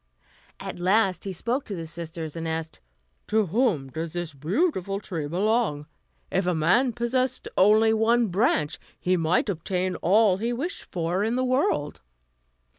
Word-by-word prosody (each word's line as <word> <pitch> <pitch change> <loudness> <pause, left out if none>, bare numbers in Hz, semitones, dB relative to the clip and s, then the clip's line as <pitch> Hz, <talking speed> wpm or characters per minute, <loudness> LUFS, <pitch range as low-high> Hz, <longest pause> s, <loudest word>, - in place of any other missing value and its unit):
At - - -6
last 190 +1 +2
he 195 - -3
spoke 235 - -2
to 200 - -5
the 165 -2 -5
sisters, 165 -1 -6
and 165 0 -4
asked: 160 0 -4 0.5
"To 215 0 +2
whom 180 - 0
does 160 +3 -5
this 175 -3 -4
beautiful 195 - -1
tree 165 -7 -4
belong? 190 -3 0 0.5
If 190 -1 0
a 180 - +2
man 180 +12 +3
possessed 255 +2 -1
only 215 +3 +5
one 225 +1 +3
branch 175 -5 +1 0.2
he 185 +1 +1
might 165 +1 +1
obtain 185 0 -1
all 200 +1 +4
he 230 +4 -1
wished 330 +11 -5
for 175 +2 -1
in 225 +2 0
the 255 0 +1
world." 250 - 0
190 Hz, 155 wpm, -25 LUFS, 165-225 Hz, 0.5 s, only